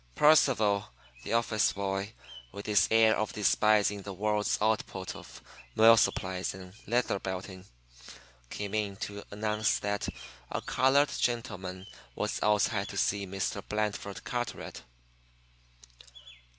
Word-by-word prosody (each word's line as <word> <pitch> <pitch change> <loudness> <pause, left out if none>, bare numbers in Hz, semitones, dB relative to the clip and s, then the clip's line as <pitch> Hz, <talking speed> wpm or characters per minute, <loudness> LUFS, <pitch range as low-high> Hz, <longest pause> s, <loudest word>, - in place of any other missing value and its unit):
Percival, 115 -9 +4 0.3
the - - -4
office 115 -2 +2
boy, 100 +1 -3 0.4
with 100 - -8
his 105 -2 +3
air 110 -1 +5
of 110 - -2
despising 105 -1 +3
the 100 0 -7
world's 105 +1 0
output 105 -3 -1
of - - -12 0.3
mill 115 +1 +8
supplies 95 -4 0
and 95 -1 -11
leather 120 -3 +1
belting, 95 0 -6 0.8
came 100 -1 -5
in 105 -2 -1
to 100 +1 -6
announce 105 +1 0
that 105 0 -2 0.4
a - - -2
colored 140 +3 +3
gentleman 95 -6 -3 0.3
was - - -2
outside 105 -1 +2
to 100 - -7
see 100 0 0
Mr. 95 +1 -3
Blandford 105 -2 -3
Carteret. 120 -2 -4
105 Hz, 120 wpm, -30 LUFS, 100-110 Hz, 0.8 s, mill